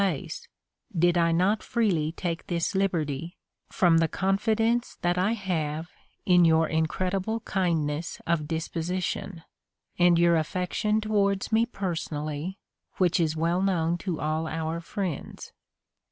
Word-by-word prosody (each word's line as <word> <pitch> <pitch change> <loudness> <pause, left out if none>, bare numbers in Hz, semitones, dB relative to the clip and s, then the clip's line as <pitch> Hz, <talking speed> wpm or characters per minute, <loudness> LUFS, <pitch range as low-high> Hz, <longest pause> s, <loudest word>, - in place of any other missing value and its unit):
place, 180 -8 -3 0.5
did 175 +1 +4
I 170 -1 +3
not 185 +6 +2
freely 180 -10 0
take 170 0 -4
this 170 -3 -1
liberty, 170 -4 -1 0.3
from 170 -3 +4
tlie 165 -1 +2
confidence 225 +5 +1
that 175 0 +2
I 200 +5 +2
have 165 -6 -2 0.4
in 180 -1 +5
your 160 -1 +4
incredible 185 +7 -1
kindness 165 -6 -1
of 165 -3 0
disposition, 170 +2 -3 0.6
and 175 -1 +5
your 170 0 +4
affection 185 +6 0
towards 200 -2 +1
me 225 +1 +3
personally, 160 -4 -4 0.4
which 180 -3 +2
is 160 -1 +1
well 170 +3 +1
known 175 -3 +1
to 175 -4 -3
all 155 +1 -1
our 160 +1 -3
friends. 185 -3 -5
175 Hz, 125 wpm, -27 LUFS, 160-195 Hz, 0.6 s, in